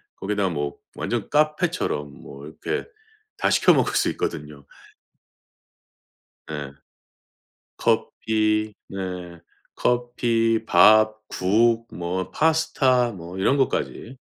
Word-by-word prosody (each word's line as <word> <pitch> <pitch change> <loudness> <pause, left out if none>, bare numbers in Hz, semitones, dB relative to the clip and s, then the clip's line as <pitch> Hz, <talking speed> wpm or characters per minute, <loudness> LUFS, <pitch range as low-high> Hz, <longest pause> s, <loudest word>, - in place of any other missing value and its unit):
거기다가 100 -1 -1
뭐 75 -4 -3 0.2
완전 120 -4 -3
카페처럼 150 - 0
뭐 70 +1 -10
이렇게 80 - -4 0.5
다 - - +1
시켜 180 - +5
먹을 130 - +1
수 - - +2
있거든요. 75 -1 -5 1.9
예. 70 -3 -5 1.1
커피 110 -1 0 0.2
네. 90 -3 -6 0.4
커피, 120 -2 +1
밥, 110 +4 +5
국, 115 +5 +2
뭐 90 +2 -3
파스타 135 - +2
뭐 90 -2 -9
이런 130 +9 +2
것까지. 130 -2 -2
110 Hz, 180 characters per minute, -23 LUFS, 90-120 Hz, 1.9 s, 시켜